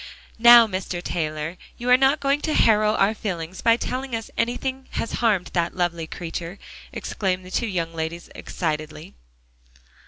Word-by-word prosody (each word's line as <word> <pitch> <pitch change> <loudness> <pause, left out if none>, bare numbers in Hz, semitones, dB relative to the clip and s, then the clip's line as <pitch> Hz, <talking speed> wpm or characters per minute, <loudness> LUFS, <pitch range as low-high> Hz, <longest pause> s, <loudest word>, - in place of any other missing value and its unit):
"Now, 235 0 +9
Mr. 185 -3 -4
Taylor, 155 -1 -3 0.2
you 240 - -6
are - - +9
not 270 +3 +3
going 280 +1 +1
to 310 - -1
harrow 215 -1 +4
our 200 +2 +3
feelings 185 -4 -5
by 230 0 +4
telling 255 0 -3
us 225 -1 -6
anything 260 +2 -2
has 230 - -3
harmed 210 -6 +1
that 170 -1 0
lovely 170 -2 -1
creature," 170 +2 -6 0.3
exclaimed 185 -2 -3
the 185 - -11
two 235 - 0
young 170 -4 -2
ladies 165 +1 -5
excitedly. 155 -2 -5
190 Hz, 155 wpm, -23 LUFS, 170-235 Hz, 0.3 s, Now